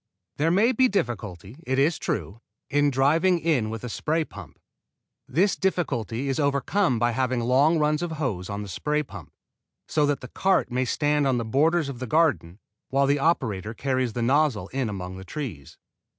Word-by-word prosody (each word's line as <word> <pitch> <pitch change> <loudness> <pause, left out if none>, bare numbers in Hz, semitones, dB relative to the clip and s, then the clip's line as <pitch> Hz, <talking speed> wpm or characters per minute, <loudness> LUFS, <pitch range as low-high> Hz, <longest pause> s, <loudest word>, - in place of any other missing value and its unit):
There 155 +3 +2
may 205 +8 +4
be 260 +1 +4
difficulty, 110 - -3
it 130 +1 0
is 150 +4 +2
true, 100 +4 -3 0.3
in 145 0 +3
driving 155 +7 +3
in 150 -9 0
with 110 -1 -6
a - - -4
spray 155 +7 -1
pump. 90 - -12 0.7
This 185 +7 +2
difficulty 140 - -1
is 135 +1 -1
overcome 140 - +1
by 120 +1 +2
having 130 0 0
long 135 +7 +3
runs 150 0 +1
of 175 -2 -3
hose 110 - -3
on 100 0 -4
the - - -8
spray 150 +11 -1
pump, 100 - -11 0.6
so 150 -2 +2
that 145 -1 0
the 130 - -7
cart 190 -3 +1
may 130 +1 0
stand 145 +2 +1
on 130 -2 +2
the 115 - -2
borders 155 +7 +2
of 135 -3 -6
the 130 - -4
garden 140 - +1 0.3
while 140 +1 +2
the 140 +1 +2
operator 115 - 0
carries 130 -3 -1
the 120 - -2
nozzle 130 -6 +2
in 130 -3 -2
among 95 -2 -6
the 95 - -8
trees. 95 - -7
135 Hz, 185 wpm, -25 LUFS, 115-155 Hz, 0.7 s, may